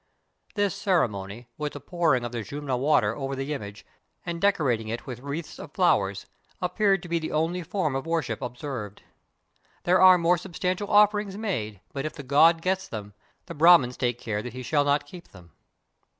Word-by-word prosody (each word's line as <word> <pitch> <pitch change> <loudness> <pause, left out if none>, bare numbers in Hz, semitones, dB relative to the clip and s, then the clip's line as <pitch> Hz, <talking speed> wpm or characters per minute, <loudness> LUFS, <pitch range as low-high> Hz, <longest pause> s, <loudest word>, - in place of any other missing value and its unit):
This 205 -2 +1
cere 180 -8 +2
mony, 100 +3 -8
with 150 -1 -3
the 145 - -7
pouring 160 -8 0
of 120 - -5
the 120 -1 -4
Jumna 140 +4 -4
water 125 -5 +2
over 135 -1 -4
the 135 +3 -3
image, 100 -6 -8 0.4
and 170 -1 -4
decorating 135 - +1
it 115 +2 -5
with 125 -3 -7
wreaths 140 +5 -6
of - - -10
flowers, 95 0 +2 0.3
ap 180 0 -3
peared 195 -4 +2
to - - -8
be 170 0 0
the 160 - -5
only 165 +4 0
form 165 -5 -2
of 135 +4 -3
worship 160 -9 -2
observed. 125 -5 -6 0.8
There 180 +1 +3
are 185 -1 +8
more 175 0 +2
substantial 185 +3 -3
offerings 205 -1 +3
made, 110 - -3
but 140 +1 -4
if - - -7
the 145 - -9
god 165 +5 +4
gets 190 +1 0
them, 105 -2 -7 0.3
the - - -8
Brahmins 150 -6 +5
take 120 -2 -1
care 105 -2 -3
that 125 +1 -7
he 130 0 -7
shall 145 +3 +2
not 145 +1 +1
keep 170 +3 -12
them. 90 -3 -17
145 Hz, 195 wpm, -26 LUFS, 120-175 Hz, 0.8 s, are